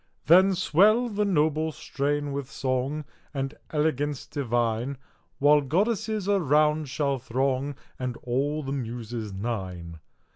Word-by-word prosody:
Then 185 +4 +6
swell 210 +8 +4
the 210 -1 0
noble 155 -3 +1
strain 145 0 -2
with 140 -1 -4
song, 135 +3 -2 0.3
And 135 +1 -2 0.2
elegance 150 -2 0
divine, 120 -1 -1 0.4
While 145 +1 +5
goddesses 210 - 0
around 155 -5 +2
shall 140 -1 0
throng, 130 +3 -1 0.2
And 125 -2 -3
all 140 +5 -1
the 135 - -4
muses 120 -4 -4
nine. 95 -6 -5
140 Hz, 115 wpm, -26 LUFS, 125-155 Hz, 0.4 s, Then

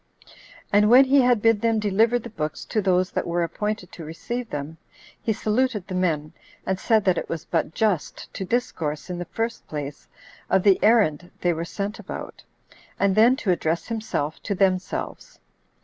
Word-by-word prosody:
And 210 +1 +5
when 255 +3 +8
he 275 +1 +5
had 245 -4 +3
bid 225 -2 +4
them 230 -1 +2
deliver 215 +3 +2
the 235 -1 -8
books 155 -7 -4
to 215 - -1
those 185 -1 +2
that - - -2
were 170 0 0
appointed 210 +3 -3
to 170 - -9
receive 230 +10 -5
them, 145 +2 -5 0.4
he 225 - 0
saluted 220 -1 0
the 190 - -6
men, 160 -5 -1 0.3
and 190 -1 -1
said 220 -1 +2
that 185 -3 +3
it - - -7
was 165 -1 -4
but 165 -1 -1
just 210 -8 -1
to - - -4
discourse, 180 - -2
in 175 - -4
the 175 - -4
first 225 +6 -4
place, 145 -2 -6 0.4
of 190 -1 +3
the 195 -2 +5
errand 180 -7 +3
they 175 -1 +2
were 165 +1 -4
sent 200 +5 -4
about, - - -8 0.6
and 200 -1 +3
then 230 +4 +6
to 255 -9 0
address 170 +1 -1
himself 215 -9 -3
to 200 - -2
themselves. 185 -1 -1
195 Hz, 180 wpm, -24 LUFS, 170-225 Hz, 0.6 s, when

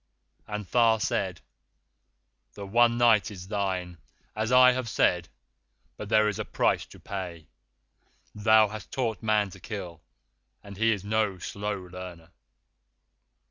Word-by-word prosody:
And 105 -1 -5
Tha 115 +2 +3
said: 95 -5 -2 1.1
'The 100 - -7
one 120 +3 +3
Night 115 -3 +4
is 95 -2 -10
thine, 95 -4 -3 0.4
as 110 +2 -2
I 125 0 +7
have 125 -2 -3
said, 90 -5 +1 0.7
but 105 - -8
there 110 -1 +4
is 105 - -2
a - - -1
price - - 0
to - - -15
pay. 90 -5 -6 0.9
Thou 110 0 +4
hast 110 -2 -9
taught 115 -5 -2
Man 105 -3 +1
to 95 - -12
kill, 90 -5 -7 0.6
and 100 0 -10
he 115 +2 +3
is 100 -3 -2
no 105 -2 0
slow 100 +2 -4
learner. 90 -2 -10
105 Hz, 140 wpm, -27 LUFS, 95-110 Hz, 1.1 s, I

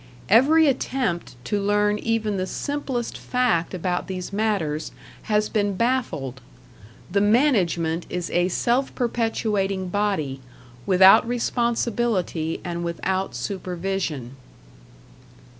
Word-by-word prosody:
Every 290 +10 +6
attempt 250 - -1
to 205 -1 -1
learn 205 +1 +2
even 220 -3 -1
the 185 0 -2
simplest 270 -1 -3
fact 230 -9 0
about 180 0 -2
these 185 0 -5
matters 195 -8 -1 0.4
has 210 0 +2
been 205 -2 0
baffled. 210 - -1 0.7
The 200 +2 +2
management 190 - +2
is 180 -1 -4
a 175 0 +2
self 240 +8 0
perpetuating 210 -5 -1
body, 180 -9 -1 0.5
without 190 +3 +7
responsibility 235 -8 -1
and 170 -1 -3
without 180 -2 -2
supervision. 175 -4 -4
200 Hz, 100 wpm, -23 LUFS, 175-230 Hz, 0.7 s, without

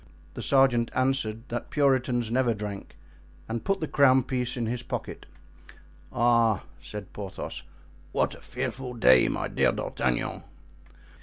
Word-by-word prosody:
The - - -6
sergeant 130 -4 +3
answered 130 -3 0
that 120 0 -4
Puritans 130 -5 +1
never 120 -2 +2
drank, 105 -1 -7 0.5
and 115 0 -3
put 195 -1 0
the 155 - -1
crown 130 -3 +5
piece 125 -1 -2
in 120 - -1
his 120 +2 -2
pocket. - - -6 0.8
"Ah!" 115 -4 +3 0.2
said 105 -2 -8
Porthos, 95 -2 -6 0.5
"what - - +1
a - - -13
fearful 125 -2 -5
day, 65 - +6
my - - -2
dear - - +2
D'Artagnan!" 60 -2 -2
120 Hz, 135 wpm, -27 LUFS, 110-130 Hz, 0.8 s, day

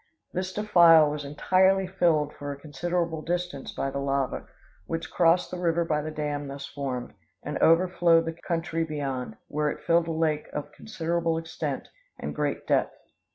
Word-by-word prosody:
This 185 +1 -2
defile 170 -7 +6
was 150 0 -4
entirely 190 +7 +3
filled 165 -5 +1
for 145 0 -6
a 140 - -7
considerable 160 +2 -2
distance 175 -4 -3
by 135 - -3
the 140 - -3
lava, 140 -1 -1 0.4
which 165 0 -4
crossed 170 +1 +3
the 180 - -4
river 170 -1 +1
by 150 -2 0
the 155 - -4
dam 150 -2 -3
thus 140 0 -6
formed, 130 -3 -5 0.3
and 150 - -3
overflowed 170 -1 +4
the 165 - -3
country 165 0 -2
beyond, 135 -7 -4
where 150 0 0
it - - -6
filled 170 0 +3
a - - -1
lake 160 -2 0
of 150 - -5
considerable 170 -5 -2
extent, 165 0 -4 0.3
and - - -5
great - - -2
depth. - - +1
160 Hz, 165 wpm, -27 LUFS, 145-170 Hz, 0.4 s, defile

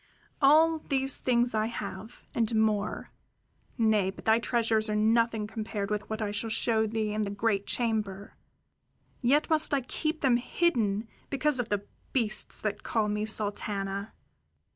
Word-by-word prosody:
"All 315 +3 +5
these 270 -2 0
things 240 -1 +2
I 215 0 +1
have, 215 -1 -7
and 230 -1 0
more 215 -2 0 0.7
nay, 215 -4 +3
but 190 - -10
thy 220 +1 +4
treasures 230 -2 +1
are 210 - 0
nothing 225 0 +2
compared 215 -1 -4
with 210 -1 -3
what 220 0 -2
I 205 - -2
shall 210 +2 -3
show 220 0 +1
thee 215 -1 -2
in 215 - -1
the 205 - -1
great 200 0 -1
chamber 210 -4 -2 0.9
yet 280 +4 +3
must 310 -2 +2
I 275 - 0
keep 310 +5 -3
them 255 -3 +4
hidden 230 - 0 0.2
because 280 0 +1
of 240 -1 -2
the 205 -1 -1 0.3
beasts 225 -5 +2
that 215 -1 -2
call 215 -2 0
me 210 +1 -1
Sultana! 200 -1 0
220 Hz, 155 wpm, -29 LUFS, 210-240 Hz, 0.9 s, All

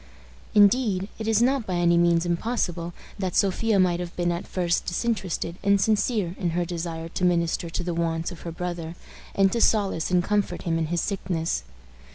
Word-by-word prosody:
Indeed, 205 -2 +4
it 220 - -4
is 225 +1 +3
not 260 -2 +1
by 185 - -1
any 170 0 +3
means 170 0 +3
impossible 175 -2 -1 0.3
that 185 -3 -2
Sophia 200 +2 +2
might 180 -2 +3
have 175 -1 -6
been 175 -1 0
at 170 +1 -4
first 175 -2 0
disinterested 180 -4 -2
and 200 0 +3
sincere 210 -3 +1
in 180 -3 0
her 175 - +1
desire 165 -1 -4
to 180 - -4
minister 170 -1 +1
to 170 - -3
the 175 0 -2
wants 165 0 -1
of 175 - -10
her 170 - -5
brother, 170 -1 -5 0.4
and 195 -1 +4
to 235 - 0
solace 200 -8 +2
and 180 -1 +3
comfort 205 +1 -1
him 165 -1 0
in 160 - -1
his 170 0 0
sickness. 175 -4 -2
180 Hz, 190 wpm, -25 LUFS, 170-200 Hz, 0.4 s, Indeed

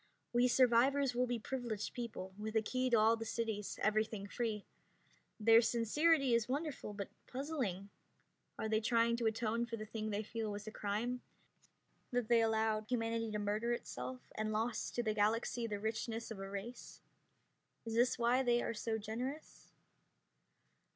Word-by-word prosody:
We 240 +1 +5
survivors 255 +2 +4
will 250 +1 +1
be 245 0 0
privileged 230 -3 -3
people, 215 -6 -5
with 215 +2 -5
a 220 - +5
key 255 +3 0
to 235 - +5
all 220 +1 +5
the 225 - -5
cities, 225 -2 -3
everything 215 -1 +1
free. 215 -1 -2 0.7
Their 225 +1 +7
sincerity 260 +5 +3
is 235 0 +2
wonderful, 280 -6 -3
but 200 -1 -5 0.2
puzzling. 250 - -3 0.7
Are - - -2
they 220 0 +2
trying 230 +1 +3
to 235 -1 +1
atone 230 +1 0
for 230 -1 -4
the 215 - -5
thing 215 0 -4
they 210 +1 -1
feel 225 0 -3
was 205 0 -5
a 215 - -6
crime; 220 +5 -2 0.9
that 245 -2 -1
they 235 -1 +6
allowed 220 -1 +1
humanity 230 -2 0
to 210 - -2
murder 210 +3 0
itself, 125 - -5
and 215 0 -2
lost 220 +1 -1
to 240 - +1
the 215 -2 +1
Galaxy 225 +3 +1
the 205 -2 -3
richness 225 +1 -3
of 215 - -6
a 195 0 -5
race? 200 +5 -7 0.9
Is 225 - -4
this 240 +2 +3
why 240 +2 +3
they 240 -2 +3
are - - -1
so 220 0 -2
generous? 245 +8 -5
225 Hz, 165 wpm, -36 LUFS, 215-240 Hz, 0.9 s, Their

